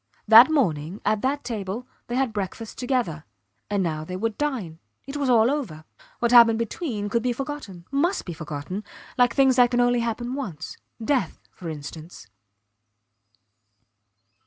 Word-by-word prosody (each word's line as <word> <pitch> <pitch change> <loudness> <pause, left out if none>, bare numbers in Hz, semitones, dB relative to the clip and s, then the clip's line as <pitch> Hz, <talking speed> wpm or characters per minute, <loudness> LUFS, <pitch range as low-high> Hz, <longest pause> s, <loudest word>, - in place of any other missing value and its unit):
That 230 +6 +9
morning, 185 - 0
at 215 0 +1
that 280 +2 -1
table, 220 -1 -4 0.2
they 240 - -3
had 260 -3 0
breakfast 210 +2 -5
together; 245 - -1 0.5
and 200 -2 0
now 155 -3 -2
they 180 +3 -6
would 220 +3 -2
dine. 225 - -3 0.3
It 275 +2 -7
was 285 -2 -1
all 235 0 +5
over! 190 - -4 0.3
What 235 0 0
had 245 - +9
happened 230 -1 +5
between 230 - -3
could 230 +3 0
be 250 +1 0
forgotten 245 - -7
must 330 +7 0
be 175 - -5
forgotten, 155 +5 -6 0.3
like 245 -1 +3
things 265 -2 +4
that 245 -1 +6
can 245 0 0
only 245 0 +3
happen 235 +1 -2
once 190 - -6 0.3
death 250 - 0 0.2
for 170 - -7
instance. 155 - -9
230 Hz, 160 wpm, -24 LUFS, 180-255 Hz, 0.5 s, That